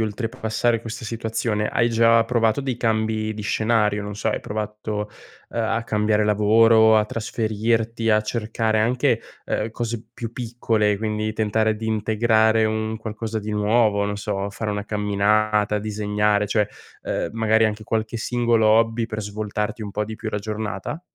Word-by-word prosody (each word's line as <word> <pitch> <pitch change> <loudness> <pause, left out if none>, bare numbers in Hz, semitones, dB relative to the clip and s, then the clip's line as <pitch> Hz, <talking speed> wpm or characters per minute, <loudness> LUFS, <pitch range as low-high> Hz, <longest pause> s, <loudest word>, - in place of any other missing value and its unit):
oltrepassare 110 +1 -1
questa 115 0 -7
situazione, 110 -1 -2
hai 120 0 +2
già 115 0 +4
provato 115 0 +1
dei 135 -3 -2
cambi 110 -2 0
di 105 - -6
scenario, 105 0 +1
non 105 0 -6
so, 105 - -4
hai - - -1
provato, 105 0 -4 0.4
ehm, 115 - -2
a 115 +1 -1
cambiare 105 -1 +1
lavoro, 110 +1 +5
a 105 - +4
trasferirti, 115 +1 -1
a 105 0 +4
cercare 110 0 -1
anche, 125 +3 +2 0.2
ehm, 110 - -2
cose 115 0 -4
più 115 -2 -6
piccole, 115 -4 0
quindi 110 0 -2
tentare 110 0 +1
di 110 +1 -5
integrare 110 0 +2
un 110 0 -1
qualcosa 110 0 -4
di 105 0 -5
nuovo, 105 0 +2
non 105 0 -2
so, 100 -1 -3
fare 105 +1 -3
una 105 0 -3
camminata, 105 0 +1
disegnare, 105 0 0
cioè, 105 0 +2 0.4
ehm, - - -2
magari 110 0 +3
anche 110 0 -1
qualche 110 +1 -2
singolo 120 -1 +1
hobby 115 +1 +3
per 110 -1 -5
svoltarti 105 +1 -3
un 100 -1 -6
po' 105 +1 -1
di 110 +1 -7
più 110 - -5
la 105 - -2
giornata? 105 - -4
110 Hz, 160 wpm, -23 LUFS, 105-115 Hz, 0.4 s, lavoro